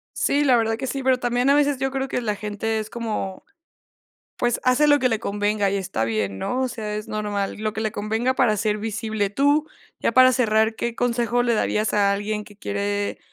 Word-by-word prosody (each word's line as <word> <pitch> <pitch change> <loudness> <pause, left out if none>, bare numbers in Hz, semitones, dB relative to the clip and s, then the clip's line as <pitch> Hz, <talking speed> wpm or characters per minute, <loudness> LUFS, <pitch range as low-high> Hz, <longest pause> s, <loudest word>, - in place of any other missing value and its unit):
Sí, 285 +1 +1
la 265 -4 +5
verdad 225 -1 0
que 265 - -4
sí, 270 +2 -3
pero 260 -1 +2
también 245 +2 +1
a 280 - +5
veces 290 -2 +2
yo 270 0 0
creo 270 0 -2
que 250 - -2
la 210 -3 -1
gente 210 +2 -3
es 215 0 -5
como, 215 -5 -4 0.9
pues, 240 -1 0
hace 255 +4 +4
lo 290 0 +5
que 255 - +2
le 225 -2 0
convenga 205 -1 0
y 200 - 0
está 190 - -2
bien, 105 -4 -2
¿no?, 250 - -2
o 260 - 0
sea, 215 -3 -5
es 210 0 -5
normal, 205 -2 -2
lo 215 0 -2
que 220 - -5
le 220 -1 -1
convenga 220 +5 -1
para 240 -5 +3
ser 210 +1 0
visible, 215 -1 -2
tú, 285 +7 +2 0.3
ya - - 0
para 255 +1 +7
cerrar, 220 -3 +2
¿qué 235 0 -2
consejo 240 0 0
le 240 -1 +1
darías 215 0 0
a 200 -1 +3
alguien 210 +1 -3
que 205 - -15
quiere 205 0 -2
220 Hz, 220 wpm, -23 LUFS, 210-250 Hz, 0.9 s, para